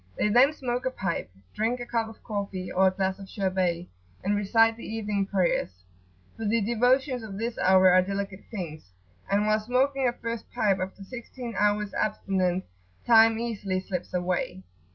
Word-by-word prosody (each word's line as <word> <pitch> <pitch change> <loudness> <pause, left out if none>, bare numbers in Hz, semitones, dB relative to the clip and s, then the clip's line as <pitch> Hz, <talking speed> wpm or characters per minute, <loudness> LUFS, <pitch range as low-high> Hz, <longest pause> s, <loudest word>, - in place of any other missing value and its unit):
They 210 - +2
then 250 +6 +6
smoke 250 -2 -2
a - - +2
pipe, 180 - -3 0.2
drink 230 +3 0
a 240 - -5
cup 230 -2 -1
of 225 - -15
coffee 200 -4 -4
or 190 +1 +4
a - - +3
glass 190 0 -1
of 195 -1 -10
sherbet, 185 -3 -1 0.4
and 205 +2 +1
recite 225 +2 +3
the 230 - -11
evening 210 -3 -2
prayers; 175 - 0 0.5
for 225 - -7
the 220 +2 +2
devotions 245 +4 +2
of 210 -3 -7
this 230 +2 -3
hour 185 0 +6
are 185 +1 +6
delicate 195 0 -4
things, 165 - -7 0.4
and 205 +1 +2
while 215 0 +3
smoking 260 +4 +1
a 240 - +1
first 230 -1 -5
pipe 195 -3 +1
after 190 +2 -5
sixteen 240 +2 -8
hours' 210 +1 +1
abstinence, 190 -3 0 0.4
time 225 -1 +6
easily 210 -5 -2
slips 185 -1 -5
away. 175 - -2
205 Hz, 175 wpm, -27 LUFS, 190-230 Hz, 0.5 s, then